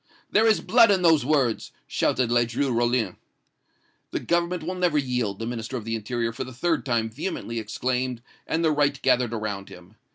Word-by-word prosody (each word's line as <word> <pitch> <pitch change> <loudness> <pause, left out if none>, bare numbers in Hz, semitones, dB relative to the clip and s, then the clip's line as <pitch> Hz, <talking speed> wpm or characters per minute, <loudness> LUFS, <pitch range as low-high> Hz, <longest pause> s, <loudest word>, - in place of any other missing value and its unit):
"'There 220 +2 +4
is 220 - +3
blood 230 -1 +5
in 190 -3 +3
those 160 -5 +5
words!' 135 -5 +1
shouted 125 -2 0
Ledru 120 +3 +1
Rollin. 120 -4 +1 0.9
"'The - - -3
Government 170 0 0
will 180 +4 -3
never 180 -4 +1
yield!' 125 -7 -1
the 115 - -5
Minister 115 +1 -4
of 110 - -7
the 115 0 -2
Interior 115 +1 -2
for 125 - -4
the 130 - -9
third 160 +6 0
time 115 -2 +1
vehemently 115 -1 -4
exclaimed, 125 +2 -2 0.2
and 165 +1 0
the 160 - +4
right 145 -1 +1
gathered 125 -2 +3
around 105 -3 -4
him. 90 +3 -14
125 Hz, 185 wpm, -25 LUFS, 115-155 Hz, 0.9 s, blood